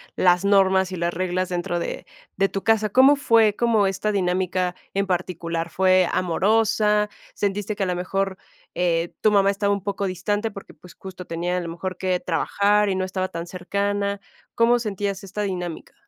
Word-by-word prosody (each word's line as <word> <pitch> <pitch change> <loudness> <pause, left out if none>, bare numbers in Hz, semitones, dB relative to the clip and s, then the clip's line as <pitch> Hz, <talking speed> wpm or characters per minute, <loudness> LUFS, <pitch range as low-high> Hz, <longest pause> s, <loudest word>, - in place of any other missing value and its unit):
las 180 +1 +3
normas 190 -1 +3
y - - -4
las 170 0 -1
reglas 185 0 -1
dentro 175 -1 -2
de - - -5 0.3
de 195 +1 +1
tu 195 - -4
casa, 220 -1 +2
¿cómo 265 +6 +6
fue 225 -6 +3
cómo 225 -4 +2
esta 195 +2 -1
dinámica 180 -1 0 0.2
en 200 0 +1
particular? 170 -2 -3
¿Fue 185 -1 +3
amorosa? 210 +3 +2 0.3
¿Sentiste 205 +1 -2
que 200 - -2
a - - +1
lo 180 -1 -1
mejor, 190 +1 -2 0.4
eh, 170 -1 0
tu 215 - +4
mamá 200 -1 +4
estaba 200 0 0
un 200 -2 -3
poco 200 0 -2
distante? 205 +4 -2
Porque, 200 -1 -11
pues, 180 - -16
justo 185 -1 -9
tenía 175 +2 -2
a - - +1
lo 170 -1 -5
mejor 185 +2 -5
que 185 -1 0
trabajar 205 +4 +1
y 190 - 0
no 185 0 -1
estaba 185 0 -2
tan 170 -1 -6
cercana, 200 +3 -2 0.4
¿cómo 240 +1 +4
sentías 200 -2 -3
esta 205 +2 -4
dinámica? 180 -4 -5
190 Hz, 185 wpm, -23 LUFS, 180-205 Hz, 0.4 s, cómo